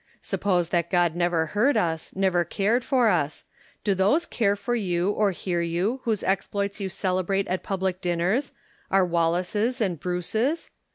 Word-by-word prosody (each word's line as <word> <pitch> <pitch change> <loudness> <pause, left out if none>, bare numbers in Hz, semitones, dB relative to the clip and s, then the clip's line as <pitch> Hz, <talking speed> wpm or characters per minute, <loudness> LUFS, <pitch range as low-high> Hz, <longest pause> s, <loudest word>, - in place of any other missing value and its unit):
Suppose 180 -4 0
that 170 -1 0
God 175 -3 +2
never 175 -2 +1
heard 245 +8 +3
us, 160 -2 -1
never 185 -2 +2
cared 210 +8 0
for 255 -4 +2
us: 155 -6 -1 0.4
do 205 - +2
those 205 - +2
cai 200 -4 +1
e - - -3
for 240 +4 -3
you 185 -4 0
or 210 0 +2
hear 175 -1 -2
you 180 +10 -1
whose 220 -4 0
exploits 200 +1 -1
you 195 -1 -3
celebrate 190 +1 -1
at 185 +1 -1
public 190 -1 -2
dinners 180 +10 0 0.2
— - - -32
our 190 -1 +4
Wallaces 180 +8 0
and 185 -8 -1
Bruces? 220 - -1
190 Hz, 170 wpm, -25 LUFS, 175-210 Hz, 0.4 s, our